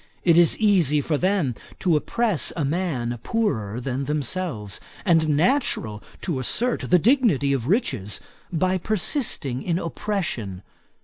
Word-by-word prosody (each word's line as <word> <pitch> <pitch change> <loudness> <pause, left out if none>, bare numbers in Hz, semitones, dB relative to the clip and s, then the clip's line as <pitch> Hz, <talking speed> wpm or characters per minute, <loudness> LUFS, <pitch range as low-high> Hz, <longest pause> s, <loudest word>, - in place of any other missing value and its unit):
It 170 -2 +5
is 170 -2 +5
easy 180 -9 +3
for 150 +2 -1
them 180 -5 +1 0.2
to 175 -4 +2
oppress 210 - +1
a 150 - -1
man 135 -7 -2
poorer 120 - -1
than 130 +2 -3
themselves; 145 - -3 0.3
and 165 -4 +3
natural 150 - +1 0.2
to 160 -7 -2
assert 240 - 0
the 180 - +6
dignity 195 - +3
of 125 -3 -2
riches, 130 - 0 0.3
by 185 +2 +1
persisting 185 - 0
in 170 -2 -1
oppression. 160 - -3
160 Hz, 130 wpm, -24 LUFS, 130-190 Hz, 0.3 s, the